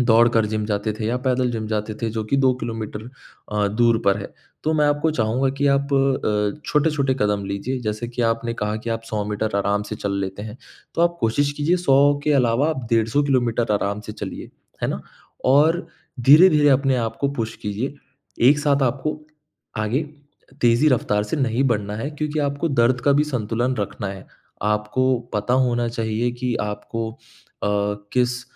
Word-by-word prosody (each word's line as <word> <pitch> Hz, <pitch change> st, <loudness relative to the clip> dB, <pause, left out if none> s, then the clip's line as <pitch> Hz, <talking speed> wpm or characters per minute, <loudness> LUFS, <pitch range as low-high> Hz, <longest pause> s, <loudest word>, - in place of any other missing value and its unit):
दौड़कर 115 Hz, -2 st, +4 dB
जिम 110 Hz, 0 st, -2 dB
जाते 105 Hz, 0 st, -1 dB
थे 110 Hz, 0 st, -4 dB
या 120 Hz, +2 st, 0 dB
पैदल 125 Hz, -1 st, +2 dB
जिम 110 Hz, -2 st, -3 dB
जाते 110 Hz, 0 st, -2 dB
थे, 115 Hz, -, +1 dB
जो 110 Hz, -1 st, -3 dB
कि 140 Hz, +6 st, 0 dB
2 130 Hz, -1 st, +4 dB
किलोमीटर 115 Hz, 0 st, -5 dB, 0.4 s
अ, 105 Hz, -1 st, +1 dB
दूर 115 Hz, +2 st, +3 dB
पर 100 Hz, 0 st, +4 dB
है। 100 Hz, -, -8 dB, 0.3 s
तो 155 Hz, -, +2 dB
मैं 150 Hz, -1 st, +3 dB
आपको 145 Hz, +2 st, +1 dB
चाहूँगा 125 Hz, +1 st, +1 dB
कि 145 Hz, -, +2 dB
आप 140 Hz, +1 st, +1 dB
अ, 130 Hz, -4 st, +1 dB
छोटे-छोटे 150 Hz, -3 st, +1 dB
कदम 105 Hz, -1 st, +1 dB
लीजिए, 110 Hz, +7 st, -3 dB
जैसे 110 Hz, +2 st, -3 dB
कि 120 Hz, 0 st, -3 dB
आपने 115 Hz, +1 st, 0 dB
कहा 105 Hz, -1 st, -2 dB
कि 115 Hz, -, -2 dB
आप 115 Hz, 0 st, -2 dB
100 105 Hz, -1 st, -1 dB
मीटर 105 Hz, 0 st, -2 dB
आराम 100 Hz, +1 st, +1 dB
से 105 Hz, -, -3 dB
चल 100 Hz, -1 st, -3 dB
लेते 95 Hz, +1 st, -4 dB
हैं, 110 Hz, +2 st, -7 dB, 0.4 s
तो 165 Hz, -, +1 dB
आप 170 Hz, 0 st, +2 dB
कोशिश 140 Hz, +6 st, +1 dB
कीजिए 150 Hz, +5 st, +1 dB
100 145 Hz, -4 st, +4 dB
के 150 Hz, -, +3 dB
अलावा 130 Hz, +2 st, +3 dB
आप 130 Hz, -6 st, -4 dB
डेढ़ 115 Hz, -1 st, +2 dB
100 145 Hz, +5 st, +2 dB
किलोमीटर 120 Hz, -4 st, +1 dB
आराम 100 Hz, +1 st, -1 dB
से -, -, -5 dB
चलिए, -, -, -7 dB, 0.3 s
है -, -, +1 dB
ना? 70 Hz, -, -3 dB, 0.4 s
और 155 Hz, +6 st, +4 dB, 0.3 s
धीरे-धीरे 150 Hz, +2 st, +7 dB
अपने 135 Hz, -1 st, +3 dB
आप 115 Hz, -1 st, -2 dB
को 140 Hz, -, +2 dB
पुश 110 Hz, -1 st, -2 dB
कीजिए, 110 Hz, +8 st, -3 dB, 0.5 s
एक 145 Hz, +1 st, +5 dB
साथ 140 Hz, -1 st, +2 dB
आपको 135 Hz, +5 st, -1 dB, 0.6 s
आगे 120 Hz, +8 st, 0 dB, 0.6 s
तेज़ी 120 Hz, +5 st, +4 dB
रफ्तार 105 Hz, -6 st, +1 dB
से 105 Hz, -, -3 dB
नहीं 130 Hz, -1 st, +1 dB
बढ़ना 105 Hz, -2 st, -1 dB
है, 140 Hz, +7 st, -3 dB
क्योंकि 150 Hz, +1 st, -3 dB
आपको 145 Hz, +3 st, -1 dB
दर्द 125 Hz, -2 st, +2 dB
का 140 Hz, -, +5 dB
भी 145 Hz, +2 st, +3 dB
संतुलन 120 Hz, -2 st, -1 dB
रखना 100 Hz, -1 st, -3 dB
है। 95 Hz, -1 st, -8 dB, 0.4 s
आपको 105 Hz, +5 st, +1 dB, 0.2 s
पता 105 Hz, +4 st, +1 dB
होना 120 Hz, 0 st, 0 dB
चाहिए 115 Hz, 0 st, -1 dB
कि 125 Hz, -2 st, 0 dB
आपको 110 Hz, +2 st, -4 dB
अ, 110 Hz, -, -9 dB, 0.4 s
किस 125 Hz, 0 st, +1 dB
120 Hz, 185 wpm, -22 LUFS, 110-140 Hz, 0.6 s, धीरे-धीरे